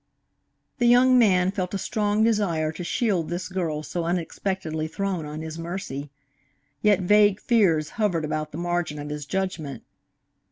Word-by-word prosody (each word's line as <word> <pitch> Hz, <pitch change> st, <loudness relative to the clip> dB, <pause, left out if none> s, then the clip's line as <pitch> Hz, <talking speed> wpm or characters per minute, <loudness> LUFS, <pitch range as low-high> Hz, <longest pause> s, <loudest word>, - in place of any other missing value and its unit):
The 240 Hz, -, +3 dB
young 250 Hz, +1 st, +6 dB
man 185 Hz, -5 st, +4 dB
felt 190 Hz, -1 st, -3 dB
a -, -, +1 dB
strong 210 Hz, +1 st, 0 dB
desire 190 Hz, -9 st, +1 dB
to 160 Hz, +3 st, -7 dB
shield 180 Hz, -2 st, 0 dB
this 175 Hz, +1 st, -3 dB
girl 165 Hz, -5 st, -2 dB
so 170 Hz, +2 st, -3 dB
unexpectedly 170 Hz, -2 st, -2 dB
thrown 180 Hz, -1 st, -3 dB
on 150 Hz, +1 st, -6 dB
his 160 Hz, +1 st, -6 dB
mercy. 165 Hz, -5 st, -5 dB, 0.7 s
Yet 205 Hz, -2 st, +4 dB
vague 205 Hz, +1 st, +4 dB
fears 180 Hz, -12 st, +2 dB
hovered 175 Hz, -7 st, +1 dB
about 155 Hz, 0 st, -3 dB
the 150 Hz, -, -7 dB
margin 175 Hz, -3 st, -2 dB
of 145 Hz, 0 st, -6 dB
his 150 Hz, -1 st, -5 dB
judgment. 185 Hz, -7 st, -3 dB
175 Hz, 155 wpm, -25 LUFS, 155-200 Hz, 0.7 s, young